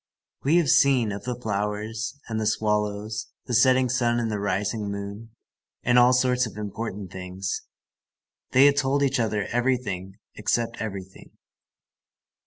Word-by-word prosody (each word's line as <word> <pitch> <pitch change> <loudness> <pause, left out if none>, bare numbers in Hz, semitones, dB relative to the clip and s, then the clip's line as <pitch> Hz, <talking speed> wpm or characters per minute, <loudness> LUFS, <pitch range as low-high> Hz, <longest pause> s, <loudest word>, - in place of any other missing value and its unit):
We 145 +5 +3
have 170 -5 +3
seen, 130 -7 +4
of 100 - -6
the 125 -1 -3
flowers, 110 +3 -3
and 110 -2 -2
the 110 - 0
swallows, 105 0 -1 0.2
the 125 - -4
setting 130 +2 +5
sun 120 -1 +1
and 115 -2 -1
the 105 - -2
rising 100 +2 -1
moon, 100 +2 -6 0.5
and 125 0 +5
all 125 +1 +6
sorts 125 -1 +2
of 105 - -11
important 105 -2 -5
things. 95 +1 -4 0.9
They 130 +2 +6
had 145 0 +5
told 140 0 +2
each 135 -1 +1
other 105 -3 0
everything 120 -7 -1 0.2
except 115 +2 -1
everything. 95 -3 -7
110 Hz, 145 wpm, -25 LUFS, 100-125 Hz, 0.9 s, all